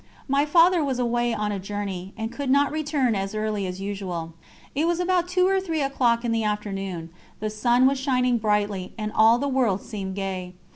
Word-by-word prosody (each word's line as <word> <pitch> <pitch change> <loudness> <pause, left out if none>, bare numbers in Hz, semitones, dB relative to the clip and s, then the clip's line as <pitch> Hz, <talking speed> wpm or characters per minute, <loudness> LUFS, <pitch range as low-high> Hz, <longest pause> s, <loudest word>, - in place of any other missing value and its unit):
My 280 +2 +2
Father 340 +2 +5
was 270 -3 -1
away 240 -1 +1
on 210 -2 -1
a 200 - -3
journey, 195 -1 -5
and 225 +1 -3
could 280 0 -4
not 280 +1 +4
return 295 -5 0
as 195 +1 -3
early 215 -2 -1
as 180 +1 -5
usual. 190 -5 -4 0.4
It 305 +5 +1
was 345 0 +1
about 360 -1 +1
two 365 0 +2
or 385 0 +2
three 325 -5 -1
o'clock 245 -3 +1
in 235 - 0
the 225 -1 +1
afternoon; 195 -5 -3 0.3
the 215 0 -3
sun 240 +4 +3
was 270 0 +3
shining 250 -3 +1
brightly, 210 -3 0
and 215 -1 -3
all 225 +2 +6
the 280 +3 -1
world 245 -8 +1
seemed 195 -4 -5
gay. 190 -2 -4
230 Hz, 200 wpm, -25 LUFS, 200-275 Hz, 0.4 s, all